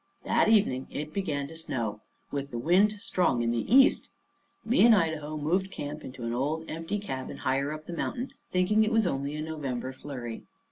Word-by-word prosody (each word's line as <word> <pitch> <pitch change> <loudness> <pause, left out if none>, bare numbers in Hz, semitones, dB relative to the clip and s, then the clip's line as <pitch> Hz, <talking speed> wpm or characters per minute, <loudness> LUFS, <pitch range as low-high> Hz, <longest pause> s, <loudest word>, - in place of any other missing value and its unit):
That - - +3
evening 195 - +3
it 150 +1 -5
began 145 -8 -2
to 165 - -10
snow, 115 -10 -3 0.3
with 140 -1 -3
the 120 - -5
wind 180 - +4
strong 180 - 0
in 115 - +1
the 120 - -2
east. 265 +2 +6 0.6
Me 230 -1 +4
and 230 -1 +8
Idaho 155 -4 -1
moved 180 +6 0
camp 150 -3 -6
into 130 -1 -8
an 115 0 -2
old 150 +6 -1
empty 165 +5 -3
cabin 135 -11 -5
higher 135 +2 0
up 155 0 -7
the 175 - -6
mountain, 250 +9 -3 0.2
thinking 185 +4 +3
it 215 - 0
was 225 -2 +3
only 140 -3 -1
a 155 - -3
November 135 -5 -4
flurry. 130 -4 -6
155 Hz, 190 wpm, -28 LUFS, 135-190 Hz, 0.6 s, and